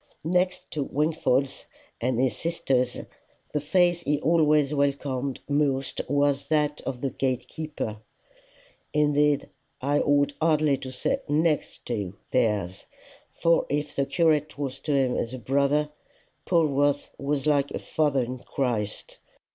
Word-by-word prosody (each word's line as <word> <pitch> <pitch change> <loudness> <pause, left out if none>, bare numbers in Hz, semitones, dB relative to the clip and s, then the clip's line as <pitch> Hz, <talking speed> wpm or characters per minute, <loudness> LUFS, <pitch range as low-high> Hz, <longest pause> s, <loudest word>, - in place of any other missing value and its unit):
Next 180 +2 0
to 150 - -2
Wingfold's 140 -2 0 0.3
and 125 0 0
his 130 -4 +2
sister's, 135 -7 -1 0.5
the 150 - 0
face 175 +2 +2
he 150 -2 0
always 150 -2 +3
welcomed 140 -2 -1
most 140 -2 0
was 145 0 +1
that 150 -1 +1
of 125 -2 -3
the 135 - -1
gate 125 -1 -1
keeper 150 -9 -5 1.0
indeed 150 -1 +2 0.3
I 145 +2 +1
ought 145 -1 +2
hardly 155 -3 +3
to 130 0 -7
say 125 - -1
NEXT 155 +1 0
to 105 -6 -3 0.2
theirs; 105 -7 0 0.4
for 165 0 +2
if 145 +1 -2
the 140 -1 0
curate 155 -4 +2
was 140 -3 -4
to 150 - -3
him 130 -2 +2
as 120 +2 -2
a - - -6
brother, 140 +4 +1 0.6
Polwarth 145 -4 +2
was 140 0 -1
like 145 -2 +2
a - - -4
father 145 -4 +1
in 125 +1 -5
Christ. 115 -6 -3
145 Hz, 135 wpm, -26 LUFS, 130-150 Hz, 1.0 s, always